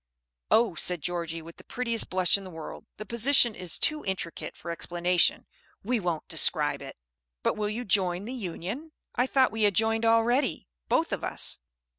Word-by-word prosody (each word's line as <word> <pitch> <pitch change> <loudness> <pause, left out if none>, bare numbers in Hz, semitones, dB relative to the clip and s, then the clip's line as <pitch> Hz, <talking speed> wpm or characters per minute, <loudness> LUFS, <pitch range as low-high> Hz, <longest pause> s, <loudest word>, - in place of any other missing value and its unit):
"Oh," 225 -4 +4
said 170 -1 0
Georgie, 165 -2 -3
with 165 +1 -12
the - - -13
prettiest 235 -2 -1
blush 185 -1 +4
in 200 - 0
the 190 - -9
world, 160 -3 -9
"the 215 - -7
position 235 +2 +3
is 180 -5 -2
too 305 0 +1
intricate 190 -3 -4
for 170 - -6
explanation; 175 +1 +1 0.4
we 240 +3 0
won't 175 -5 -2
describe - - +2
it." - - -9 0.5
"But - - +1
will 210 -1 -1
you 225 +4 -3
join 185 -3 +1
the 245 - -5
Union?" 225 - -5 0.2
"I 250 +1 +1
thought 260 -3 +3
we 220 +1 -4
had 205 -3 +3
joined 225 +2 +2
already, 230 - +2 0.2
both - - +2
of - - -3
us." - - +1
205 Hz, 180 wpm, -28 LUFS, 175-235 Hz, 0.5 s, Oh